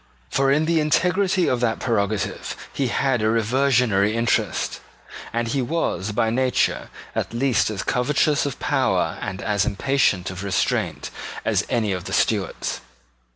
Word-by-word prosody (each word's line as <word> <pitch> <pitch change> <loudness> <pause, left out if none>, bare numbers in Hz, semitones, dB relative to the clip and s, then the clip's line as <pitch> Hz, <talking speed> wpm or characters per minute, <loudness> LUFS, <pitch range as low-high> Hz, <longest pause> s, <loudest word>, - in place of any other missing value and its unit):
For 135 0 +2
in 150 +3 +3
the 165 0 +2
integrity 180 +4 +2
of 125 - +1
that 120 -2 +1
prerogative 110 -4 -1 0.2
he 135 - 0
had 125 0 +1
a 110 - +2
reversionary 115 -3 +2
interest; 115 0 0 0.5
and 115 0 -1
he 135 +3 0
was, 125 - -1
by 110 +2 +1
nature, 130 +1 +1 0.2
at - - -3
least 125 -3 +2
as 105 -3 -3
covetous 145 +3 +1
of 140 - -5
power - - 0
and 95 +1 -5
as 105 -2 +1
impatient 100 -4 +1
of 95 +1 -7
restraint 95 -2 -1 0.3
as - - +1
any 110 -4 +1
of 90 -2 -3
the - - -5
Stuarts. - - 0
120 Hz, 150 wpm, -23 LUFS, 105-140 Hz, 0.5 s, in